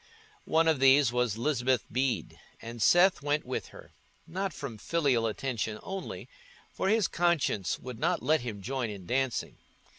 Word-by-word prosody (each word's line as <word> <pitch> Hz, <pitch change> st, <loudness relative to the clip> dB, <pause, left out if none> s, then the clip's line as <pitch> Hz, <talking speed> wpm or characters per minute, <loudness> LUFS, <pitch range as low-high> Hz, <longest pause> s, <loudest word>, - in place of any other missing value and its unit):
One 165 Hz, +1 st, +3 dB
of 160 Hz, -4 st, +3 dB
these 135 Hz, -1 st, +5 dB
was 125 Hz, -3 st, 0 dB
Lisbeth 130 Hz, -1 st, +1 dB
Bede, 130 Hz, 0 st, -1 dB, 0.2 s
and 115 Hz, 0 st, -8 dB
Seth 175 Hz, -, +5 dB
went 145 Hz, +1 st, 0 dB
with 125 Hz, -, -4 dB
her—not 190 Hz, +3 st, -8 dB
from 135 Hz, -9 st, -7 dB
filial 135 Hz, -8 st, +1 dB
attention 110 Hz, -2 st, -3 dB
only, 195 Hz, -1 st, -6 dB, 0.5 s
for 190 Hz, -, -1 dB
his 220 Hz, -1 st, +3 dB
conscience 160 Hz, -, 0 dB
would 125 Hz, -2 st, -8 dB
not 175 Hz, +4 st, 0 dB
let 155 Hz, -1 st, +3 dB
him 110 Hz, -5 st, -6 dB
join 130 Hz, +1 st, -2 dB
in 100 Hz, -3 st, -8 dB
dancing. 130 Hz, +3 st, -1 dB
135 Hz, 150 wpm, -29 LUFS, 115-160 Hz, 0.5 s, these